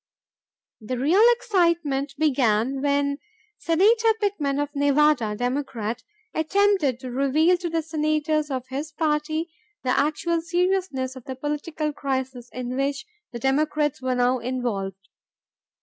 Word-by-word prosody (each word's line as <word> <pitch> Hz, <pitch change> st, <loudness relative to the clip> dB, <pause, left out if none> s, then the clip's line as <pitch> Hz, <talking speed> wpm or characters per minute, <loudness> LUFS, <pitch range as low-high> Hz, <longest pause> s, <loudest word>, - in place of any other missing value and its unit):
The 245 Hz, +3 st, -4 dB
real 310 Hz, -, +3 dB
excitement 335 Hz, -, 0 dB
began 265 Hz, -3 st, +1 dB
when 280 Hz, 0 st, +1 dB, 0.4 s
Senator 440 Hz, +7 st, +3 dB
Pittman 330 Hz, -10 st, 0 dB
of 290 Hz, 0 st, -1 dB
Nevada, 285 Hz, -6 st, +3 dB
Democrat, 245 Hz, -2 st, -2 dB, 0.3 s
attempted 320 Hz, -, +2 dB
to 255 Hz, -2 st, -6 dB
reveal 280 Hz, +7 st, +3 dB
to 350 Hz, -1 st, -3 dB
the 330 Hz, -1 st, -1 dB
senators 305 Hz, -1 st, 0 dB
of 260 Hz, -2 st, -3 dB
his 285 Hz, +4 st, -4 dB
party 310 Hz, +1 st, -1 dB, 0.3 s
the 255 Hz, -, +1 dB
actual 315 Hz, +4 st, +1 dB
seriousness 345 Hz, -6 st, -1 dB
of 260 Hz, -, -11 dB
the 260 Hz, -, -5 dB
political 300 Hz, +2 st, -3 dB
crisis 260 Hz, -3 st, -3 dB
in 250 Hz, 0 st, -4 dB
which 275 Hz, +6 st, -1 dB, 0.3 s
the 240 Hz, -, -5 dB
Democrats 295 Hz, +3 st, 0 dB
were 255 Hz, -1 st, 0 dB
now 250 Hz, +1 st, +2 dB
involved. 205 Hz, -7 st, -3 dB
285 Hz, 125 wpm, -24 LUFS, 260-320 Hz, 0.4 s, real